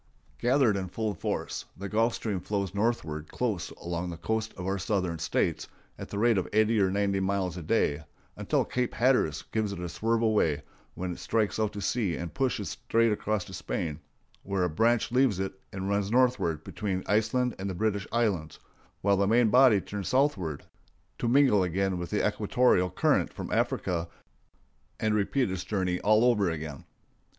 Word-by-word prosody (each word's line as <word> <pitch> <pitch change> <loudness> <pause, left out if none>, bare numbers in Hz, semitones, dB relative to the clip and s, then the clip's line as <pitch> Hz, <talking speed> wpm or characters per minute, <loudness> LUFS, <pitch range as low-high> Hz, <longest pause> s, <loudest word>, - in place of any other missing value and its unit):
Gathered 120 -4 +3
in 95 -1 -3
full 105 +3 -2
force, 85 - -3
the 100 +2 -5
Gulf 115 +3 +1
Stream 105 -5 -2
flows 100 0 -2
northward 100 -8 -1
close 110 -8 -2
along 85 +1 -4
the 85 - -6
coast 110 +5 -2
of 90 - -5
our 95 +1 -1
Southern 90 -4 -1
States 80 - -1 0.3
at - - -7
the 100 - -5
rate 115 -1 +3
of 95 - -3
eighty 110 +1 +3
or 95 - +3
ninety 100 0 +1
miles 95 -2 -1
a 90 - -6
day 80 -4 +1 0.3
until - - 0
Cape 125 -1 -2
Hatteras 130 +2 +2
gives 110 -2 0
it 100 - -5
a 90 - -3
swerve 115 +7 0
away, 80 -10 +2 0.3
when 90 0 -3
it - - -7
strikes 110 -1 0
out 110 -1 0
to 100 - -5
sea 100 -6 0
and 85 +1 -5
pushes 125 -6 -1
straight 115 0 +1
across 105 -2 -1
to 95 - -11
Spain, 80 -4 -3 0.4
where 100 -2 -1
a 90 - +1
branch 115 +8 +2
leaves 125 -6 +3
it 95 0 -2 0.2
and 95 0 -4
runs 100 0 0
northward 120 -11 +2
between 95 -4 -3
Iceland 110 +4 +1
and 100 +1 -3
the 95 - -4
British 105 0 -1
Islands, 100 -10 0 0.4
while 100 0 +3
the 100 0 +2
main 115 +1 +4
body 125 -5 +6
turns 100 0 -5
southward 105 - +1 0.6
to 120 - -1
mingle 125 -5 +5
again 95 +1 0
with 85 - -5
the - - +1
equatorial 105 -8 +2
current 90 - +1
from - - -7
Africa 85 -3 0 0.9
and 110 -1 +1
repeat 105 +3 +1
its 95 -2 -3
journey 95 -4 -1
all 110 +3 +4
over 105 -7 +3
again. 80 -3 -6
100 Hz, 180 wpm, -28 LUFS, 90-115 Hz, 0.9 s, body